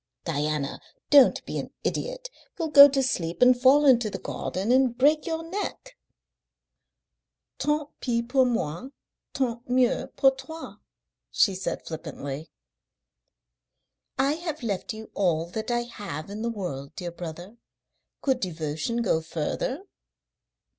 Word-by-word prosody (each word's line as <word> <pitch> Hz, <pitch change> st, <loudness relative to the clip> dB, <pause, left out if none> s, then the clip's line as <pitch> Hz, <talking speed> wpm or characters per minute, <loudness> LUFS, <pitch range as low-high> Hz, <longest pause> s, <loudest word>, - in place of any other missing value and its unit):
"Diana, 150 Hz, -2 st, -2 dB, 0.3 s
don't 285 Hz, -3 st, +6 dB
be -, -, -4 dB
an -, -, -5 dB
idiot! -, -, -3 dB, 0.3 s
You'll 330 Hz, -2 st, -2 dB
go 285 Hz, -1 st, +11 dB
to 270 Hz, -1 st, +1 dB
sleep 170 Hz, -9 st, -2 dB
and 250 Hz, 0 st, +7 dB
fall 265 Hz, +4 st, +5 dB
into 240 Hz, -5 st, +5 dB
the 195 Hz, -, -5 dB
garden 195 Hz, +6 st, -3 dB
and 255 Hz, -2 st, +3 dB
break 300 Hz, +5 st, +3 dB
your 325 Hz, 0 st, -2 dB
neck." 410 Hz, +8 st, -5 dB, 1.6 s
"Tant 300 Hz, 0 st, 0 dB
pis 235 Hz, -2 st, 0 dB
pour 260 Hz, +1 st, +4 dB
moi. 225 Hz, -, -2 dB, 0.4 s
Tant 245 Hz, -3 st, -1 dB
mieux 250 Hz, -1 st, +2 dB
pour 270 Hz, -1 st, +4 dB
toi," 320 Hz, +5 st, -9 dB, 0.5 s
she 200 Hz, -, +3 dB
said 190 Hz, -, -4 dB
flippantly. 155 Hz, -2 st, -6 dB, 1.7 s
"I 275 Hz, +2 st, +2 dB
have 320 Hz, -5 st, -5 dB
left 200 Hz, -5 st, -2 dB
you 220 Hz, 0 st, -9 dB
all 170 Hz, -5 st, +1 dB
that 220 Hz, +5 st, -4 dB
I 240 Hz, 0 st, +1 dB
have 200 Hz, -8 st, -7 dB
in 210 Hz, +2 st, -6 dB
the 235 Hz, -, -1 dB
world, 175 Hz, -11 st, -5 dB
dear 175 Hz, -1 st, -5 dB
brother. 175 Hz, +5 st, -8 dB, 0.7 s
Could 265 Hz, -3 st, +2 dB
devotion 170 Hz, +6 st, -2 dB
go 160 Hz, -7 st, +1 dB
further?" 165 Hz, -, -3 dB
235 Hz, 135 wpm, -26 LUFS, 175-270 Hz, 1.7 s, go